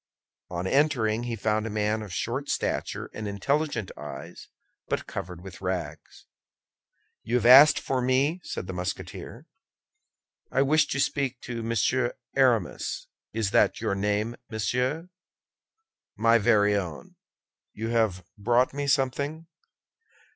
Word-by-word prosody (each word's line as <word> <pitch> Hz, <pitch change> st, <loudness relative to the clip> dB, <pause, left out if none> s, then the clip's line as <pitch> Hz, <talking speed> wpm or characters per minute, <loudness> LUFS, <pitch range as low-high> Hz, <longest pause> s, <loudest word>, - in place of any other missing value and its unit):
On 90 Hz, 0 st, -4 dB
entering 120 Hz, -3 st, +2 dB
he 120 Hz, -1 st, -2 dB
found 110 Hz, +1 st, 0 dB
a -, -, -4 dB
man 105 Hz, +1 st, 0 dB
of 105 Hz, -3 st, -8 dB
short 125 Hz, +9 st, -3 dB
stature -, -, -2 dB
and 110 Hz, -1 st, -5 dB
intelligent 115 Hz, +2 st, -1 dB
eyes, 75 Hz, +3 st, -9 dB, 0.4 s
but -, -, -2 dB
covered 90 Hz, 0 st, -6 dB
with 95 Hz, -1 st, -10 dB
rags. 90 Hz, -5 st, -5 dB, 1.0 s
"You 120 Hz, -, -2 dB
have 120 Hz, -2 st, +1 dB
asked 135 Hz, +5 st, +9 dB
for 130 Hz, -1 st, -1 dB
me?" 135 Hz, +7 st, +1 dB
said -, -, -5 dB
the 95 Hz, -, -6 dB
Musketeer. 90 Hz, 0 st, -6 dB, 1.1 s
"I 135 Hz, -, +3 dB
wish 150 Hz, +2 st, +3 dB
to 140 Hz, -, -2 dB
speak 135 Hz, -2 st, 0 dB
with 120 Hz, -1 st, -4 dB
Monsieur 115 Hz, +2 st, 0 dB, 0.2 s
Aramis. 125 Hz, -9 st, +1 dB, 0.2 s
Is 110 Hz, -2 st, -1 dB
that -, -, +3 dB
your -, -, -1 dB
name, 105 Hz, +4 st, -1 dB
monsieur?" 125 Hz, +9 st, -1 dB, 1.1 s
"My 115 Hz, +1 st, +4 dB
very 105 Hz, -2 st, +4 dB
own. 90 Hz, -7 st, -5 dB, 0.6 s
You 110 Hz, +1 st, -4 dB
have 110 Hz, -6 st, +1 dB
brought 120 Hz, +5 st, +2 dB
me 145 Hz, 0 st, -3 dB
something?" 140 Hz, +4 st, 0 dB
115 Hz, 130 wpm, -27 LUFS, 100-130 Hz, 1.1 s, asked